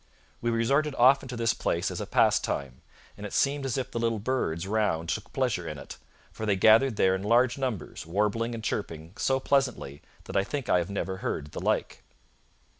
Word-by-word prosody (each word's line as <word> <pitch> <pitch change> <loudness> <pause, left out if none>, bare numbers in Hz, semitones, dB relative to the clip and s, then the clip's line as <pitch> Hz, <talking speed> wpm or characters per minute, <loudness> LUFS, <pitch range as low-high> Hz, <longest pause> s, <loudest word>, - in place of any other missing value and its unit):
We 120 - 0
resorted 140 +6 +1
often 130 +2 +4
to 125 - -5
this 115 -1 +2
place - - -1
as - - -4
a - - -5
pastime; 65 -2 +1 0.3
and 105 - -11
it 105 - -6
seemed 140 0 +1
as 130 - -2
if 130 0 -3
the 120 - -3
little 115 -1 0
birds 100 -8 -1
round 95 -6 0
took - - -3
pleasure - - -1
in - - -5
it, - - -10 0.3
for 110 +6 -5
they 100 - +3
gathered 110 +6 +5
there 95 -2 +3
in 95 - -2
large 120 +4 +3
numbers, 125 - -4
warbling 105 +6 0
and 110 - -7
chirping 85 -6 -4
so 135 +2 +1
pleasantly 130 - 0 0.2
that - - -9
I 100 - +3
think 140 +4 -4
I 90 - +4
have 85 - -3
never 95 -1 -3
heard 75 -5 -4
the - - -6
like.' - - -1
110 Hz, 200 wpm, -28 LUFS, 95-130 Hz, 0.3 s, gathered